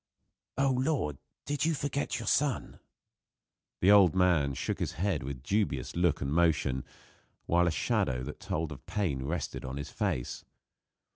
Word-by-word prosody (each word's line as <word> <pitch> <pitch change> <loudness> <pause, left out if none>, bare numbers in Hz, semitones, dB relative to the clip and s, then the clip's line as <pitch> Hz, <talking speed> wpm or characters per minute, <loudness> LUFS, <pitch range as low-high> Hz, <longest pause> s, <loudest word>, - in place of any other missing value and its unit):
"My 140 - +3
lord! 130 - 0 0.3
Do 145 - -1
you 160 0 +2
forget 140 0 -2
your - - -5
son?" 140 -2 0 1.0
The 95 - +6
old 100 -5 +7
man 85 -7 +3
shook - - -2
his - - -2
head 95 -3 0
with 65 -1 -6
dubious 80 - -1
look 85 -2 +2
and 70 +1 -1
motion, 75 -6 +2 0.6
while 90 +1 +3
a - - +2
shadow 65 -4 0
that 75 +3 -7
told 80 0 -3
of 65 -4 -9
pain 75 -11 -1
rested 85 +5 -3
on 65 +1 -5
his 70 +1 -6
face. 60 - -2
85 Hz, 155 wpm, -30 LUFS, 70-105 Hz, 1.0 s, old